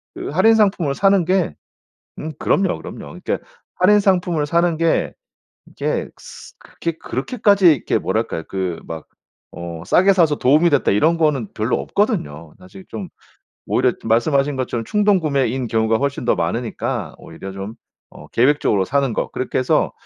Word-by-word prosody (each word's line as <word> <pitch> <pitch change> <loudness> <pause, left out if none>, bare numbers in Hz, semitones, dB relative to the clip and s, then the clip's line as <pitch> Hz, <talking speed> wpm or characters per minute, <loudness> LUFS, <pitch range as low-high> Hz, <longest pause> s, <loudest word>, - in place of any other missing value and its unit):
그 - - -5
할인 185 +9 +4
상품을 190 -9 +2
사는 195 -3 +3
게 185 - +1 0.6
음 155 0 -5
그럼요 190 -2 +1
그럼요. - - -9
그러니까 - - -1 0.4
할인 205 +3 +4
상품을 175 -6 +1
사는 170 +2 +1
게 165 -1 +1 0.5
이게 - - -3
스 - - -13
그렇게 170 -1 -5
그렇게까지 195 - +2
이렇게 130 - -1
뭐랄까요 80 - -2
그 95 -3 -3
막 80 -1 -7 0.5
어 85 -1 -7
'싸게 190 - +4
사서 165 -6 +3
도움이 155 +6 +4
됐다.' 145 - +2
이런 160 +12 +3
거는 150 -8 +1
별로 - - -1
없거든요. 75 +2 -2
사실 95 +1 -14
좀 105 -5 -6 0.6
오히려 - - +2
말씀하신 135 +5 +1
것처럼 120 -3 -3
충동구매인 145 - +1
경우가 110 0 +1
훨씬 140 -3 -2
더 - - +4
많으니까 115 +8 -3
오히려 95 0 -9
좀 95 +3 -7 0.4
어 - - -13
계획적으로 120 -6 +2
사는 135 -1 0
거 - - -1
그렇게 130 - -3
해서 130 - +1
140 Hz, 340 characters per minute, -20 LUFS, 110-175 Hz, 0.6 s, 할인